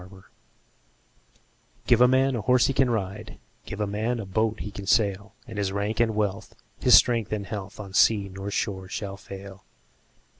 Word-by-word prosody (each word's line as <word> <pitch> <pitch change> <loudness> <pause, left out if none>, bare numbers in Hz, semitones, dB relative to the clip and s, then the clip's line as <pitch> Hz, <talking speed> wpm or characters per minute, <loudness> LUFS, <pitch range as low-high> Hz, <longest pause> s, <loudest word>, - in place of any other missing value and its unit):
Gifts 95 +1 -15 1.6
GIVE 120 -1 +4
a 125 - +8
man 130 +1 +2
a 115 - -2
horse 125 +3 +3
he 135 - +1
can 135 -2 +2
ride, 100 -5 -4 0.3
Give 100 - -6
a 105 - 0
man 110 +4 -2
a 110 - -5
boat 110 +3 -1
he 105 - -6
can 100 -1 -8
sail; 100 -1 +1
And 115 -4 -7
his 100 -1 -1
rank 100 +3 -2
and 115 -2 +2
wealth, 105 -2 -2 0.2
his - - +6
strength 115 -4 +4
and 105 -2 -2
health, 100 -1 -7
On 100 -2 -8
sea 100 0 +4
nor 95 +1 -7
shore 95 -2 -3
shall 100 0 -5
fail. 95 0 -11
105 Hz, 185 wpm, -25 LUFS, 100-115 Hz, 1.6 s, a